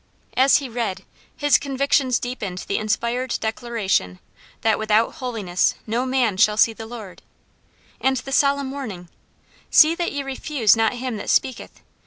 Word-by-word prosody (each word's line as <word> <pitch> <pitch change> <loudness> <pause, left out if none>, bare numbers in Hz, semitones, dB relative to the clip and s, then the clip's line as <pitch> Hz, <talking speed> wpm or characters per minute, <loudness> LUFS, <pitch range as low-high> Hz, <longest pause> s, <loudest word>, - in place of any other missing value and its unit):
As 265 +2 +5
he 280 - -4
read, 230 -5 -3 0.3
his 290 -1 +4
convictions 275 -2 +1
deepened 210 -7 -5
the 200 - -1
inspired 235 +4 -1
declaration 220 - -1 0.4
that 220 -1 +2
"without 220 +1 +2
holiness 220 - -1
no 235 +4 -1
man 250 -7 +1
shall 210 +2 +3
see 225 0 +4
the 220 0 -9
Lord," 220 -6 -10 0.8
and 265 0 +1
the 270 +3 -6
solemn 280 -1 +2
warning, 210 -11 -7 0.6
"See 310 +1 +6
that 340 0 -2
ye 285 -1 -3
refuse 270 -4 +1
not 225 0 +1
him 250 -2 -4
that - - -6
speaketh. 260 - -1
240 Hz, 150 wpm, -22 LUFS, 215-265 Hz, 0.8 s, See